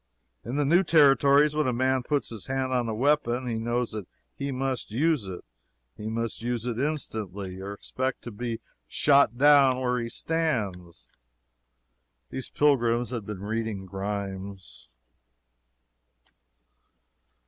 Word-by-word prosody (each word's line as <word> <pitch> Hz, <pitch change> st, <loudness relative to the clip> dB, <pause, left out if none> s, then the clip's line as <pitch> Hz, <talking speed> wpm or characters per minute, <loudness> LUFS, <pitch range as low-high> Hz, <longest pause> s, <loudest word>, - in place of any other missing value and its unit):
In 120 Hz, -, -5 dB
the 145 Hz, 0 st, +1 dB
new 170 Hz, +6 st, +4 dB
Territories, 145 Hz, -2 st, +5 dB
when 155 Hz, -2 st, +1 dB
a 125 Hz, -, +1 dB
man 130 Hz, +2 st, +1 dB
puts 145 Hz, +3 st, -1 dB
his 110 Hz, -4 st, -7 dB
hand 130 Hz, -1 st, -1 dB
on 120 Hz, -2 st, 0 dB
a -, -, -1 dB
weapon, 130 Hz, -1 st, +1 dB
he 115 Hz, -2 st, -2 dB
knows 120 Hz, +1 st, -1 dB
that 105 Hz, -4 st, -6 dB, 0.3 s
he 140 Hz, 0 st, -4 dB
must 130 Hz, -1 st, -2 dB
use 140 Hz, -1 st, +1 dB
it; 90 Hz, -2 st, -7 dB, 0.5 s
he 105 Hz, -, -5 dB
must 115 Hz, 0 st, -3 dB
use 120 Hz, -1 st, -2 dB
it 120 Hz, -1 st, -2 dB
instantly 105 Hz, -, -3 dB
or 100 Hz, +1 st, -5 dB
expect 130 Hz, +6 st, -4 dB
to 120 Hz, -, -7 dB
be 115 Hz, +1 st, -4 dB, 0.3 s
shot 140 Hz, -, +4 dB
down 140 Hz, -2 st, +6 dB
where 125 Hz, -1 st, 0 dB
he 115 Hz, -1 st, -3 dB
stands. 100 Hz, -, -2 dB, 1.2 s
Those 130 Hz, -, -4 dB
pilgrims 120 Hz, -5 st, +2 dB
had 115 Hz, -5 st, -4 dB
been 100 Hz, -2 st, -6 dB
reading 110 Hz, -2 st, -3 dB
Grimes. 95 Hz, -8 st, -6 dB
120 Hz, 135 wpm, -27 LUFS, 105-135 Hz, 1.2 s, down